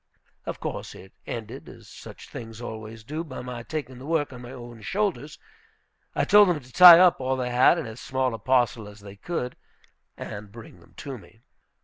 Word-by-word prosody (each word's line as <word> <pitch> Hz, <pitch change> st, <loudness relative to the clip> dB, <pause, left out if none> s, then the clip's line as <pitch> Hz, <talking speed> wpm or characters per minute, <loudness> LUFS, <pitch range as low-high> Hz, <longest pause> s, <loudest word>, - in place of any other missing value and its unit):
Of -, -, -5 dB
course -, -, -6 dB
it 95 Hz, -, -14 dB
ended, 115 Hz, -2 st, -7 dB
as -, -, -14 dB
such -, -, -12 dB
things 115 Hz, -1 st, -9 dB
always 110 Hz, -1 st, -8 dB
do, 155 Hz, +8 st, -5 dB
by 145 Hz, -6 st, -8 dB
my 125 Hz, -1 st, -7 dB
taking 130 Hz, -1 st, -6 dB
the 135 Hz, -, -10 dB
work 155 Hz, -4 st, 0 dB
on 125 Hz, -, -10 dB
my 120 Hz, 0 st, -10 dB
own 120 Hz, -3 st, -10 dB
shoulders. 155 Hz, -, -2 dB, 0.8 s
I -, -, +1 dB
told 205 Hz, -1 st, +6 dB
them 170 Hz, -4 st, 0 dB
to 130 Hz, -2 st, -18 dB
tie 180 Hz, -2 st, +11 dB
up 180 Hz, -5 st, +5 dB
all 130 Hz, 0 st, -1 dB
they 125 Hz, -1 st, -2 dB
had 125 Hz, +7 st, +5 dB
in 165 Hz, -, -3 dB
as 110 Hz, +1 st, -9 dB
small 130 Hz, -2 st, -1 dB
a 115 Hz, -, -6 dB
parcel 120 Hz, -2 st, +1 dB
as 105 Hz, 0 st, -13 dB
they 100 Hz, -1 st, -11 dB
could, 125 Hz, -, -4 dB, 0.6 s
and 105 Hz, -1 st, -8 dB
bring 115 Hz, -5 st, -13 dB
them 85 Hz, +1 st, -22 dB
to 135 Hz, -3 st, -7 dB
me. 110 Hz, +2 st, -20 dB
125 Hz, 205 wpm, -25 LUFS, 110-145 Hz, 0.8 s, tie